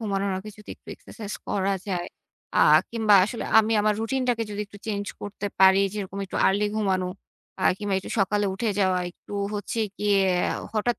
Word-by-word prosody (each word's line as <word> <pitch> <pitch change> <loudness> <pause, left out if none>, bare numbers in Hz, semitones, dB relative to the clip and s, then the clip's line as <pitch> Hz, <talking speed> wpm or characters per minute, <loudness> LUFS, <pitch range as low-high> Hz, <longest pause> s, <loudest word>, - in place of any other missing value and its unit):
ঘুমানোর 200 -2 -1
আগে 215 +3 -8
যদি, 210 - -16
একটু - - -23
এক্সারসাইজ 210 -3 -8
করা 195 0 0
যায়, 180 -3 -2 0.5
আ - - +4 0.3
কিংবা 220 -3 +3
আসলে 230 +3 -5
আমি 220 0 +3
আমার 210 0 +2
রুটিনটাকে 245 0 0
যদি 205 0 -4
একটু 205 0 -14
চেঞ্জ 205 -2 -2 0.2
করতে 205 0 -5
পারি, 190 0 +7
যেরকম 200 -2 -5
একটু - - -6
আর্লি 200 +2 +2
ঘুমানো, 190 -4 0 0.5
আ - - -3 0.2
কিংবা 205 -2 -2
একটু - - -9
সকালে 205 +1 +1
উঠে 220 +4 -2
যাওয়া, 185 -2 +2
একটু 175 - -15 0.2
হচ্ছে 205 +2 -4 0.2
গিয়ে, 205 -1 +2 0.6
হঠাৎ 225 +1 0
205 Hz, 175 wpm, -25 LUFS, 195-215 Hz, 0.6 s, পারি